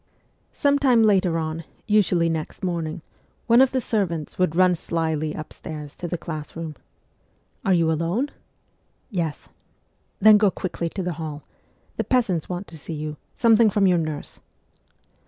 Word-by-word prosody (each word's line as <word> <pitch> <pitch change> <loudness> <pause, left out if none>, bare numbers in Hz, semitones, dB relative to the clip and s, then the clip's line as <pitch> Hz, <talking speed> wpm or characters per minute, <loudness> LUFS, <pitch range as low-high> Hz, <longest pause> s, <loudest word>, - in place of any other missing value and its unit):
Some 285 0 +3
time 250 -5 +4
later 190 -5 +3
on, 160 0 -3 0.2
usually 190 -5 +3
next 160 +3 -4
morning, 170 -2 -2 0.4
one 235 +1 +6
of 265 - +5
the 260 - 0
servants 180 - -2
would 180 -3 +2
run 185 0 +5
slyly 160 -2 -2
upstairs 155 -1 -8
to 175 - -4
the 175 - -2
class 155 -2 -7
room. 165 -2 -5 0.4
' - - -42
Are 195 - +4
you 165 -2 +3
alone? 170 - 0 0.4
' - - -43
'Yes.' 165 -7 -3 0.4
' - - -44
Then 215 +1 +7
go 205 -2 +5
quickly 175 -2 -3
to 190 +3 -4
the 180 -1 -2
hall. 150 -2 -5 0.5
The - - 0
peasants 200 - +1
want 180 +2 -4
to 160 -1 -10
see 165 - -6
you; 150 0 -5 0.2
something 230 -1 +5
from 200 0 +2
your 180 -2 +4
nurse.' 155 -2 -5
170 Hz, 165 wpm, -24 LUFS, 160-205 Hz, 0.5 s, Then